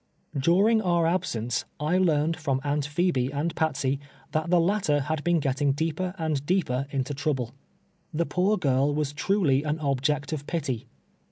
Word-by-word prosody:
During 190 Hz, +11 st, +4 dB
our 175 Hz, -4 st, +2 dB
absence, 125 Hz, -10 st, -1 dB, 0.2 s
I 155 Hz, +5 st, +1 dB
learned 165 Hz, -2 st, +2 dB
from 140 Hz, -5 st, -1 dB
Aunt 145 Hz, 0 st, 0 dB
Pbebe 145 Hz, -5 st, +1 dB
and 150 Hz, +4 st, -2 dB
Patsey, 140 Hz, -4 st, 0 dB, 0.3 s
tbat 155 Hz, +1 st, 0 dB
tbe 175 Hz, 0 st, +5 dB
latter 160 Hz, -8 st, +1 dB
bad 155 Hz, -1 st, -1 dB
been 175 Hz, -1 st, +3 dB
getting 140 Hz, 0 st, +1 dB
deeper 165 Hz, +5 st, -2 dB
and 155 Hz, -4 st, -1 dB
deeper 145 Hz, -6 st, 0 dB
into 140 Hz, 0 st, -2 dB
trouble. 135 Hz, -4 st, -1 dB, 0.6 s
Tbe 170 Hz, +2 st, +1 dB
poor 195 Hz, +4 st, +2 dB
girl 140 Hz, -2 st, +2 dB
was 150 Hz, -1 st, -1 dB
truly 145 Hz, -3 st, +2 dB
an 150 Hz, +1 st, -1 dB
object 145 Hz, 0 st, 0 dB
of 145 Hz, -2 st, -5 dB
pity. 135 Hz, -7 st, -2 dB
150 Hz, 160 wpm, -26 LUFS, 140-170 Hz, 0.6 s, tbe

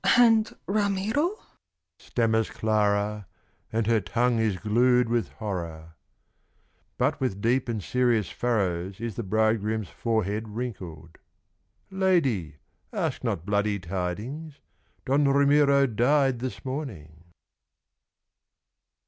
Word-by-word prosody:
"And 225 Hz, -2 st, +4 dB
Ramiro?" 210 Hz, -, 0 dB, 0.6 s
stammers 115 Hz, -2 st, 0 dB
Clara, 105 Hz, -2 st, 0 dB, 0.4 s
And 110 Hz, 0 st, 0 dB
her 115 Hz, -1 st, +2 dB
tongue 115 Hz, +6 st, +1 dB
is 110 Hz, -4 st, +1 dB
glued 125 Hz, +4 st, +3 dB
with 120 Hz, -1 st, 0 dB
horror. 85 Hz, -6 st, -5 dB, 1.0 s
But -, -, 0 dB
with 105 Hz, -7 st, -1 dB
deep 120 Hz, +4 st, +1 dB
and 110 Hz, -4 st, -2 dB
serious 120 Hz, -5 st, +1 dB
furrows 95 Hz, -6 st, -1 dB
Is 115 Hz, -1 st, -4 dB
the -, -, -3 dB
bridegroom's 110 Hz, -1 st, 0 dB
forehead 110 Hz, +1 st, -1 dB
wrinkled. 90 Hz, -9 st, -7 dB, 0.7 s
"Lady, 155 Hz, -, +1 dB, 0.4 s
ask -, -, -2 dB
not 85 Hz, -, -2 dB
bloody 105 Hz, 0 st, +1 dB
tidings 100 Hz, -, -5 dB, 0.5 s
Don 140 Hz, +2 st, +2 dB
Ramiro 140 Hz, 0 st, +4 dB
died 130 Hz, +2 st, +2 dB
this 130 Hz, +2 st, -5 dB
morning." 90 Hz, -, -6 dB
115 Hz, 100 wpm, -26 LUFS, 100-135 Hz, 1.0 s, And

